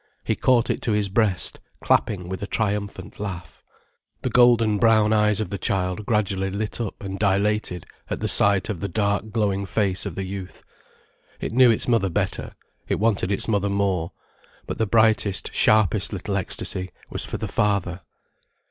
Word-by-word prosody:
He - - 0
caught 125 -3 +2
it - - -3
to 110 - 0
his 105 -1 0
breast, 100 -2 0 0.2
clapping 90 -4 +1
with 95 +1 -5
a 100 - -4
triumphant 105 -1 -3
laugh. 95 -4 -7 0.6
The - - -1
golden 115 -4 +4
brown 110 -1 +4
eyes 105 -1 +3
of 110 - -3
the 100 - -4
child 95 +2 -2
gradually 100 -4 0
lit 105 +4 -3
up 110 -3 -5
and 95 0 -5
dilated 100 -3 0 0.2
at - - -3
the - - -1
sight 100 -2 +4
of 105 -6 -4
the 100 - -3
dark 100 +2 -1
glowing 100 -3 -1
face 95 -1 0
of - - -7
the 95 - -3
youth. 95 -1 -8 0.8
It - - -4
knew 125 0 +6
its 115 - +2
mother 115 -5 +2
better, 85 - -3 0.3
it - - 0
wanted 100 -3 +1
its 100 - +1
mother 100 -2 +1
more. 100 -4 0 0.5
But - - -6
the 110 - +1
brightest, 110 -2 +2
sharpest 105 -2 +3
little 100 +1 -3
ecstasy 95 -1 -3 0.2
was - - -4
for - - -5
the - - -4
father. 100 -3 0
100 Hz, 175 wpm, -23 LUFS, 95-110 Hz, 0.8 s, knew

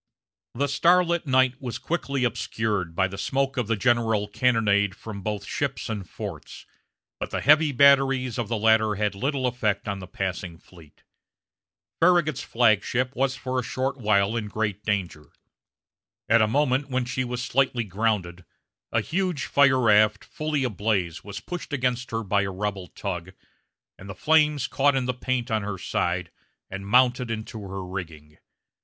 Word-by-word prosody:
The 140 +4 +1
starlit 170 +3 +2
night 130 0 +2
was 125 -3 -4
quickly 140 -6 -2
obscured 105 -6 -2
by 95 +1 +2
the 95 +1 -8
smoke 135 +4 -1
of 125 -4 -1
the 115 - +1
general 110 -2 +1
cannonade 105 -4 +2
from 105 -1 -8
both 105 0 -4
ships 140 0 -3
and 100 -6 -5
forts; - - -8 0.5
but - - -4
the - - -2
heavy 150 +1 +5
batteries 135 -2 +4
of 115 - -2
the 115 +1 -1
latter 110 0 +3
had 105 0 0
little 130 +5 -1
effect 110 -5 -1
on 100 -1 -3
the 90 - -9
passing 90 -2 -4
fleet. 80 -3 -19 1.0
Farragut's 170 -4 +3
flag 110 -4 +3
ship 125 +1 -1
was 135 +1 0
for 130 -1 -3
a - - -2
short 130 +3 -2
while 105 -2 +2
in 110 -2 -2
great 105 -1 -3
danger. 95 -8 -2 1.0
At 115 +1 +5
a 110 - +4
moment 140 +2 +1
when 130 -1 -1
she 125 +1 -2 0.2
slightly 125 0 +1
grounded 95 -4 -2 0.5
a - - +2
huge 180 -3 -2
fire 140 -2 +4
raft, 105 -2 +4
fully 155 -2 -2
ablaze, 100 -7 -1
was 105 0 -7
pushed 175 +6 -7
against 125 -2 -1
her 115 0 -2
by 100 0 +1
a 100 - -2
rebel 95 -1 -4
tug, 90 -2 -6 0.7
and 100 - -11
the 95 - -6
flames 150 -1 +3
caught 140 0 +2
in 130 -1 0
the 125 - -1
paint 125 0 -2
on 110 -1 +1
her 100 -1 -4
side, 90 0 -2 0.4
and 95 +1 -6
mounted 125 +2 +3
into 110 -1 -5
her 95 -1 -6
rigging. 80 -5 -8
115 Hz, 165 wpm, -25 LUFS, 100-130 Hz, 1.0 s, heavy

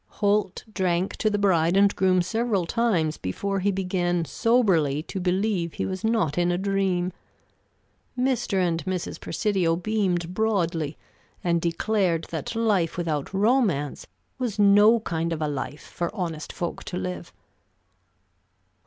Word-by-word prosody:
Holt 205 -2 +1
drank 185 -1 0
to 215 - +1
the 210 - 0
bride 180 -3 +3
and 200 0 +4
groom 185 -1 +3
several 220 -1 0
times 170 -7 0
before 195 - -2
he 200 +2 +1
began 180 -3 0
soberly 170 - +2
to 190 - -5
believe 180 -1 0
he - - -2
was 185 -1 -4
not 215 -9 +1
in 175 0 +2
a 175 - 0
dream. 190 -2 0 1.0
Mr. 250 -6 0
and 170 -3 +1
Mrs. 185 -2 -3
Presidio 190 -6 0
beamed 180 -2 -1
broadly, 170 -8 0 0.5
and 170 -1 +1
declared 175 0 0
that 160 - -4
life 205 -8 +1
without 155 -5 -2
romance 195 - +1 0.3
was 235 -5 -2
no 205 +3 +6
kind 170 -4 -2
of 165 - -2
a 155 - 0
life 145 +1 -4
for 170 -1 -4
honest 165 -6 -4
folk 175 - -4
to 180 - -4
live. 180 -1 -5
185 Hz, 140 wpm, -25 LUFS, 170-205 Hz, 1.0 s, no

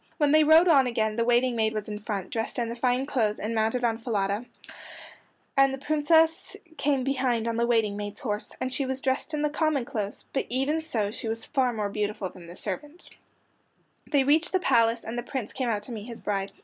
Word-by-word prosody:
When 295 -2 +3
they 310 +1 +6
rode 320 +3 +6
on 275 -6 +5
again 220 -3 0
the 230 - +1
waiting 240 +1 +2
maid 220 -1 +1
was 215 -1 -4
in 210 -1 -5
front, 200 -3 -4
dressed 225 -1 -2
in 235 -2 -1
the 235 - -4
fine 250 +2 +1
clothes 225 -7 0
and 215 +2 -3
mounted 225 +3 0
on 230 -1 +1
Falada, 205 -1 -1 1.1
and 275 0 +5
the 270 - -4
Princess 320 +4 +2 0.2
came 280 -3 +1
behind 255 -4 0
on 230 - -1
the 235 +1 +1
waiting 225 -4 +2
maid's 205 0 -6
horse, 210 -3 -3
and 255 0 -2
she 270 0 0
was 265 0 -1
dressed 265 +3 -1
in 300 - -1
the 300 - +2
common 305 -5 0
clothes, 210 -5 -4
but 270 - -1
even 270 +6 0
so 225 -10 -1
she 225 - -6
was 225 0 -2
far 260 -2 +1
more 215 -3 -2
beautiful 210 -1 -2
than 175 -2 -13
the 175 - -10
servant. 290 - -6 1.0
They 285 -3 +3
reached 315 +6 +2
the 375 - +3
palace, 230 -7 +2
and 235 +2 -4
the - - -2
Prince 240 -2 -5
came 255 -3 -2
out 210 -2 -1
to 245 - -5
meet 215 -3 -6
his 235 -2 -9
bride. 195 -1 -2
240 Hz, 225 wpm, -27 LUFS, 215-275 Hz, 1.1 s, they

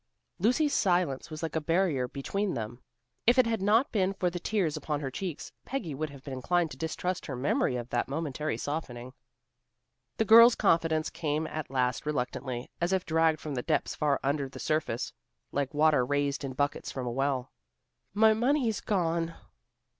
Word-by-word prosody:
Lucy's 255 - +2
silence 175 -9 +1
was 155 0 -7
like 165 - -3
a 160 - +1
barrier 165 -5 +1
between 190 +9 -2
them. 120 +1 -5 0.5
If 240 +2 +6
it 255 - +6
had 225 -3 -1
not 220 +7 +3
been 195 -3 +1
for 180 -2 0
the 175 - -4
tears 180 -5 0
upon 150 -1 -2
her 135 -2 -4
cheeks, 175 0 -5
Peggy 235 - -4
would 155 +3 -3
have 140 -2 -13
been 140 - -6
inclined 165 +5 0
to - - -8
distrust 180 +3 -3
her 135 - -4
memory 200 - +1
of 120 -1 -4
that - - 0
momentary 150 -2 -2
softening. 130 -3 -5 1.0
The 220 - +2
girl's 230 +3 +9
confidence 165 -4 +2
came 155 -1 -1
at 155 -1 -5
last 125 +1 0
reluctantly, 125 -3 -3
as 175 +2 +1
if 190 -1 0
dragged 160 -1 +2
from 150 - -5
depths 125 -2 0
far 145 -3 +1
under 140 0 0
the - - -11
surface, 155 -7 -1 0.4
like 140 -1 -1
water 150 -3 +4
raised 145 +2 0
in 135 -1 -4
buckets 145 +2 -1
from 130 -2 -4
a 120 - -2
well. 135 0 -1 0.6
"My 220 +1 +6
money's 240 -1 +1
gone." 170 -4 0
155 Hz, 175 wpm, -29 LUFS, 135-185 Hz, 1.0 s, girl's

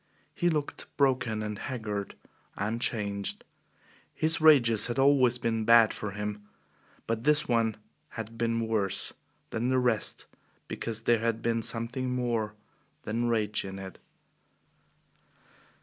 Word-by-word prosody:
He 175 - +1
looked 150 -3 -3
broken 125 -6 +1
and 105 -1 -5
haggard 105 -6 -4 0.4
and 110 +4 -2
changed. 100 -4 -2 0.7
His 160 0 +2
rages 120 -9 +6
had 120 - -3
always 135 -3 +4
been 115 -2 -1
bad 115 -1 +6
for 105 - -5
him, 105 +1 -5 0.6
but 115 0 -2
this 150 0 +3
one 115 -3 +1 0.4
had 115 0 -6
been 115 0 -1
worse 100 -4 0 0.4
than 120 +3 -1
the 130 - +2
rest 120 -4 +1 0.4
because 115 -1 -5
there 115 -1 +3
had 115 0 -1
been 115 -1 +1
something 120 +3 -1
more 115 -4 -1 0.5
than 115 +2 -1
rage 105 -2 0
in 95 0 -7
it. 95 -2 -9
115 Hz, 130 wpm, -29 LUFS, 105-125 Hz, 0.7 s, rages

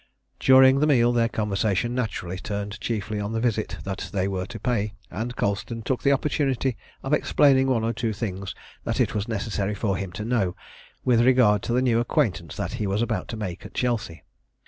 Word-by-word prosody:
During 130 0 +7
the 150 - +3
meal 120 -5 +4
their 115 -1 +2
conversation 105 +1 0
naturally 100 -7 -3
turned 100 0 -5
chiefly 105 -2 -2
on 105 +2 -3
the 115 - 0
visit 110 -2 -1
that 95 -1 -5
they 95 -2 0
were 95 -2 -3
to 115 - -8
pay, 105 -2 -1 0.2
and 115 +6 -4
Colston 105 +3 -2
took 130 +1 -1
the 140 - +3
opportunity 135 -3 0 0.3
of 135 - -1
explaining 135 -3 +4
one 120 -4 +1
or 115 +1 0
two 115 0 -1
things 100 -3 -4 0.3
that - - -2
it - - +2
was 105 +1 -2
necessary 105 -2 -2
for 100 -3 -1
him 95 -1 -4
to 105 +3 -5
know 105 -7 0 0.5
with 120 -2 +4
regard 120 -5 +5
to 120 - -2
the 125 +1 +2
new 120 -3 +3
acquaintance 115 - 0
that - - -3
he 105 - 0
was 100 +4 +1
about - - -2
to 115 - -5
make 95 -5 -5
at - - -11
Chelsea. 115 -9 -2
110 Hz, 200 wpm, -25 LUFS, 100-125 Hz, 0.5 s, During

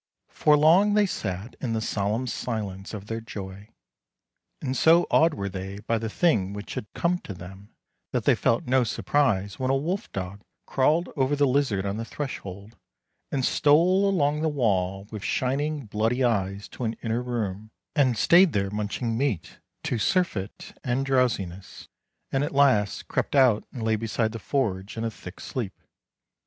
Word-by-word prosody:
For 150 -1 +4
long 180 +8 +5
they 210 -1 +5
sat 100 - -4
in 120 -3 -1
the 110 - 0
solemn 110 +3 -1
silence 105 -5 -4
of 100 -1 -8
their 115 +1 -4
joy, 100 -1 -8 0.9
and 130 - -3
so 165 +6 +5
awed 160 0 +4
were 100 0 -3
they 95 +1 -6
by 115 +1 0
the 110 0 -3
thing 105 - +1
which 105 0 -7
had 105 - -5
come 175 +1 +1
to 100 - -8
them 95 +3 -11 0.4
that - - -1
they - - +6
felt 115 - +1
no 130 0 +3
surprise 105 -5 0
when 130 0 0
a 135 - +3
wolf 180 +9 -3
dog 95 +1 -5 0.2
crawled 150 +6 +2
over 135 0 +1
the 145 0 +3
lizard 130 -8 +1
on 100 +1 -2
the 115 - -3
threshold, 105 -6 -6 0.6
and 135 -3 0
stole 180 +7 +4
along 150 -5 +1
the 160 - +2
wall 95 -8 0
with 105 -2 -6
shining, 140 +2 -1
bloody 110 +5 0
eyes 100 -4 0
to - - -7
an 115 -1 0
inner 115 +1 0
room, 110 -4 -3 0.3
and 130 -6 +3
stayed 170 - +6
there 100 -1 0
munching 105 +3 -2
meat 115 - -2 0.2
to 120 - -1
surfeit 110 - -1
and 130 +2 0
drowsiness, 110 -9 -1 0.4
and 135 +1 +1
at 145 -1 -3
last 130 -8 +3
crept - - -1
out 125 -6 +4
and 120 - -6
lay 110 0 +2
beside 110 0 -1
the 115 - -6
forge 100 -5 -2
in 110 - -2
a 115 - -1
thick 90 -3 -11
sleep. 115 -7 -5
115 Hz, 170 wpm, -26 LUFS, 100-140 Hz, 0.9 s, they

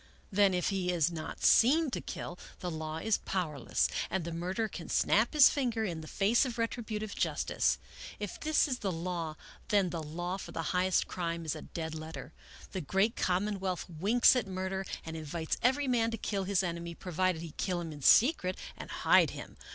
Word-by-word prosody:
Then, 195 -1 +4
if 180 - +1
he 190 -3 -1
is 175 -1 +2
not 160 -2 -6
seen 290 +5 +5
to - - -3
kill, 175 - -6 0.2
the 180 - -4
law 155 0 -4
is 215 +6 +1
powerless 155 -9 -1 0.2
and 190 - -1
the 170 - -4
murderer 185 +7 -2
can 180 -5 -8
snap 220 +7 +3
his 300 -3 +8
finger 245 -5 0
in 170 -5 -3
the 155 - -9
face 210 +7 +3
of 250 -4 -3
retributive 220 -2 -3
justice. - - 0 0.4
If 205 -3 -6
this 310 0 +2
is 255 -3 -2
the 195 -3 -1
law, 165 -2 -3 0.3
then 200 -4 +2
the 165 - -3
law 175 +4 -4
for - - -9
the 165 - -3
highest 185 0 +2
crime 170 -2 -3
is 155 - -1
a - - -7
dead 160 -1 -5
letter. 155 -2 -7 0.4
The 190 - -3
great 195 +8 +1
common 195 +3 0
wealth 185 -2 -2
winks 200 +11 +4
at 245 -5 0
murder 190 0 -3 0.2
and 160 0 -6
invites 160 +1 -3
every 265 +3 +2
man 235 -3 +2
to 225 - -3
kill 200 -2 -2
his 195 -1 +2
enemy, 170 -1 -4
provided 180 -1 -1
he 165 - -7
kill 180 -2 -1
him 165 -2 -5
in 145 -1 -9
secret 200 - +4 0.2
and - - -9
hide - - +4
him. - - -9
185 Hz, 200 wpm, -31 LUFS, 165-215 Hz, 0.4 s, his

